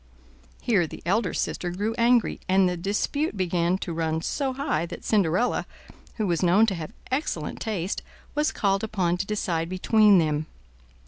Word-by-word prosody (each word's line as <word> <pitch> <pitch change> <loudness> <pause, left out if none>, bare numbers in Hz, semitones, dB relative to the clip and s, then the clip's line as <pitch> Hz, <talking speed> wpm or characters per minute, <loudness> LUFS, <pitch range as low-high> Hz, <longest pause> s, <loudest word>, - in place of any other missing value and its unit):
Here 200 -9 +2
the - - -10
elder 195 +2 +1
sister 180 - -2
grew 205 +5 -2
angry, 235 0 +3
and 190 0 +4
the 180 - -1
dispute 205 - -1
began 175 -1 +1
to 175 -3 -5
run 160 0 -1
so 275 -2 -1
high 255 - -1
that 175 - -8
Cinderella, 200 +2 +1 0.5
who 215 - -1
was 175 -3 0
known 185 +5 +5
to 215 - 0
have 165 -4 -6 0.2
excellent 255 - -2
taste, 195 -4 -2 0.3
was 300 +1 +1
called 195 -1 0
upon 185 -5 0
to 195 +2 -3
decide 170 -6 -1
between 205 +2 +4
them. 155 -2 +1
190 Hz, 165 wpm, -25 LUFS, 170-220 Hz, 0.5 s, known